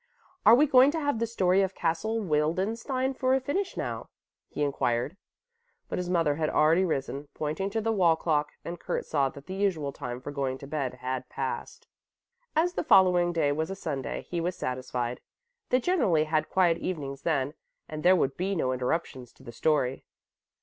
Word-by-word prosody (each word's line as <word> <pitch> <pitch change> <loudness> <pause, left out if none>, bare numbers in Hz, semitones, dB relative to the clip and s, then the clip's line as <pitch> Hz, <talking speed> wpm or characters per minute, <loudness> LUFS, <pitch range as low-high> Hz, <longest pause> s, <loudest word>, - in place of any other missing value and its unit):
"Are 230 - +10
we 290 +5 +5
going 265 -1 +6
to 325 - -1
have 285 -6 0
the 230 - 0
story 190 -4 +2
of 190 -1 -1
Castle 215 +8 -1
Wildenstein 205 - 0
for 260 0 +2
a - - +2
finish 360 +9 -2
now?" - - -4 0.4
he 150 - -2
inquired. 135 +1 0 0.7
But - - -2
his 180 -1 -3
mother 165 -5 +2
had 155 -1 0
already 160 +4 +4
risen, 140 -4 -2
pointing 155 +6 -2
to 220 +2 -1
the 225 +1 0
wall 180 -6 +4
clock, 150 -2 0 0.2
and 170 0 -5
Kurt - - -3
saw 140 -3 +1
that 140 +1 -12
the 185 - -6
usual 180 -8 -1
time 125 -4 -6
for 140 +3 -7
going 135 -2 -2
to 140 - -10
bed 140 -3 -3
had 130 0 -4
passed. 130 -1 -5 0.7
As 340 +3 +2
the - - -2
following 180 - +5
day 160 -4 +1
was 160 +3 -1
a 195 - -4
Sunday, 145 -8 -4
he 170 -1 -2
was 175 +2 -2
satisfied. 125 -1 -3 0.5
They 255 - +4
generally 240 - +2
had 155 0 0
quiet 175 -3 +3
evenings 140 -6 -4
then 145 -3 0 0.3
and 155 -1 -6
there 180 +3 +6
would 135 -6 +1
be 195 +2 -1
no 130 -6 0
interruptions 130 -1 -2
to - - -20
the 120 - -9
story. 135 +1 0
165 Hz, 190 wpm, -28 LUFS, 140-195 Hz, 0.7 s, Are